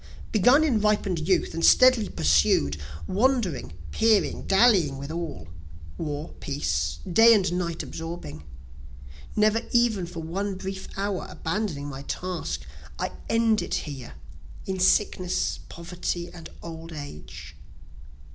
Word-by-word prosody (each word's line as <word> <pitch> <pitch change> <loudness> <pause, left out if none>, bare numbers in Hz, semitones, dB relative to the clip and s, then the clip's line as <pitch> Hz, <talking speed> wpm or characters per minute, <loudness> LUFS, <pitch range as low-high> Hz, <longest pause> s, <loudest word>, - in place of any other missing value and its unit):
Begun 245 +8 +5
in 250 -9 +2
ripen'd 205 -4 +1
youth 185 - +2
and 165 - -3
steadily 255 -5 +6
pursued, 75 -1 +2 0.2
Wandering, 205 - 0 0.2
peering, 220 -2 +2
dallying 195 - +4
with 140 +2 -6
all 160 - -5 0.5
war, 150 0 -4
peace, 80 - -1
day 225 +6 +7
and 190 -4 +1
night 170 -2 -2
absorbing, 165 - -7 0.9
Never 215 +1 +3
even 230 -7 +2
for 170 -1 -7
one 195 +5 -3
brief 190 0 -6
hour 200 -1 -2
abandoning 165 -4 -3
my 135 -1 -7
task, 180 +5 -4 0.4
I - - -2 0.2
end 225 -1 +3
it - - -2
here 140 -5 -8 0.5
in 190 -1 -3
sickness, 185 -1 +1
poverty, 175 0 -4
and 165 -2 -10
old 165 0 -8
age. 80 - -9
180 Hz, 120 wpm, -26 LUFS, 150-210 Hz, 0.9 s, day